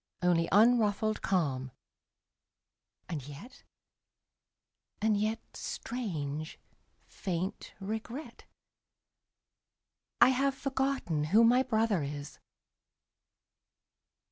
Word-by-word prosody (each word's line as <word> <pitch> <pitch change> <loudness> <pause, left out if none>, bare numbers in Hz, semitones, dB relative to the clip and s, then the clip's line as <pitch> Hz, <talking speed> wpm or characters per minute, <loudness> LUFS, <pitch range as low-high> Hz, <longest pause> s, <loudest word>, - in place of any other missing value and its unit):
Only 170 -2 +3
unruffled 215 0 +4
calm; 140 -9 0 1.4
and 160 -6 -4
yet 145 - -11 0.7
— - - -55
and 215 0 +2
yet 215 +2 0
— - - -43
Strange, 155 - -4 0.5
faint 185 0 -4
regret 220 +8 -6 0.9
— - - -60
I - - +8
have 270 +1 +1
forgotten 265 - -1
who 210 +9 +5
my 245 +2 +6
brother 220 -7 +1
is! 145 0 -6
210 Hz, 85 wpm, -31 LUFS, 160-240 Hz, 1.4 s, I